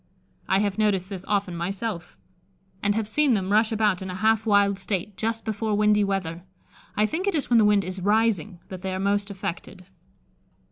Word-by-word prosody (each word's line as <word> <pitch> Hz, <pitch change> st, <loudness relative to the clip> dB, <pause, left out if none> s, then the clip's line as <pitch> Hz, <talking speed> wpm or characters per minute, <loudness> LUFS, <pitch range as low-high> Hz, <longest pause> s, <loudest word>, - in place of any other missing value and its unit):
I 190 Hz, -, +4 dB
have 205 Hz, 0 st, -1 dB
noticed 200 Hz, -3 st, +1 dB
this 190 Hz, -2 st, -5 dB
often 200 Hz, -4 st, 0 dB
myself, 185 Hz, -, -4 dB, 0.6 s
and 205 Hz, 0 st, +1 dB
have 220 Hz, -1 st, -1 dB
seen 275 Hz, +2 st, +2 dB
them 190 Hz, -1 st, -2 dB
rush 220 Hz, +2 st, +3 dB
about 210 Hz, -4 st, +1 dB
in 190 Hz, -, -5 dB
a 180 Hz, -, -5 dB
half 220 Hz, +2 st, +2 dB
wild 200 Hz, -1 st, +3 dB
state 190 Hz, +1 st, -3 dB
just 225 Hz, +1 st, -3 dB
before 220 Hz, -1 st, -1 dB
windy 210 Hz, 0 st, +4 dB
weather. 185 Hz, -4 st, -2 dB, 0.6 s
I 210 Hz, -, +4 dB
think 330 Hz, -, -2 dB
it 400 Hz, -, +1 dB
is 290 Hz, -4 st, -2 dB
when 235 Hz, -, +6 dB
the 215 Hz, -, +5 dB
wind 205 Hz, -1 st, +4 dB
is 185 Hz, +1 st, -5 dB
rising 210 Hz, -2 st, +1 dB
that 185 Hz, -1 st, -7 dB
they 190 Hz, -1 st, -3 dB
are -, -, -3 dB
most 200 Hz, +1 st, 0 dB
affected. 185 Hz, -1 st, -6 dB
205 Hz, 195 wpm, -25 LUFS, 190-220 Hz, 0.6 s, when